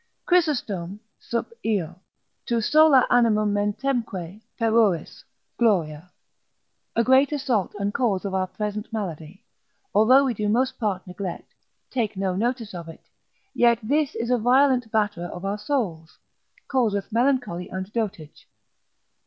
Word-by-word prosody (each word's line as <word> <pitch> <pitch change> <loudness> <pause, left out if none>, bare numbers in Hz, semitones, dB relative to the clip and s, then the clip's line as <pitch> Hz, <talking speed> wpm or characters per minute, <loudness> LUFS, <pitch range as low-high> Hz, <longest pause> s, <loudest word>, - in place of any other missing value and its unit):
Chrysostom, 220 - 0 0.2
sup. 235 - -4
Io. 190 -7 -1 0.5
Tu 235 -1 +1
sola 300 +2 +5
animum 215 -4 +3
mentemque 205 -3 -2 0.2
peruris, 220 -6 +1 0.4
gloria. 175 -7 +1 0.8
A 230 - +3
great 260 +4 +4
assault 255 -10 -1
and 200 0 -2
cause 210 -8 0
of 195 - -3
our 190 -1 0
present 210 +3 -5
malady, 190 -1 -6 0.5
although 255 +6 +6
we 255 - 0
do 210 -1 -2
most 255 +4 0
part 200 -5 -2
neglect, 180 -1 -7 0.4
take 220 -5 -2
no 190 -1 -1
notice 230 +1 -2
of 170 -2 -7
it, 165 - -14 0.4
yet 235 -1 +4
this 285 +5 0
is 235 +2 -2
a 250 - +3
violent 250 0 +3
batterer 205 -5 -1
of 180 +2 -7
our 200 +2 -2
souls, 200 - -3 0.5
causeth 225 -6 0
melancholy 240 -7 0
and 190 +2 -6
dotage. 205 -10 -5
215 Hz, 130 wpm, -24 LUFS, 190-245 Hz, 0.8 s, although